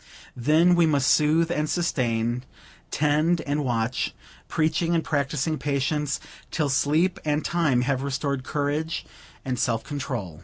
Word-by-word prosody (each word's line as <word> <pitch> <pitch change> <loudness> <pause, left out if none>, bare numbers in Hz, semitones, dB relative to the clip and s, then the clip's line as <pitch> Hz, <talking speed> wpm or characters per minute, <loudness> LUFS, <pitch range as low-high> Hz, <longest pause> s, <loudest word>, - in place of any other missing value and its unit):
Then 155 +8 +4
we 170 -1 +4
must 145 -3 +3
sooth 160 +2 +3
and 150 -2 -1
sustain, 120 -8 0 0.5
tend 155 +3 +2
and 145 0 -1
watch; 120 -1 -1 0.3
preaching 165 +2 +1
and 165 - +1
practicing 150 +1 -1
patience, 145 0 -1 0.3
till 150 -3 -1
sleep 160 +7 +2
and 150 0 0
time 155 -8 +2
have 130 +1 0
restored 140 -1 -2
courage 150 +4 -2 0.4
and 130 -2 -2
self 115 -1 0
control. 125 - -5
145 Hz, 130 wpm, -25 LUFS, 130-160 Hz, 0.5 s, Then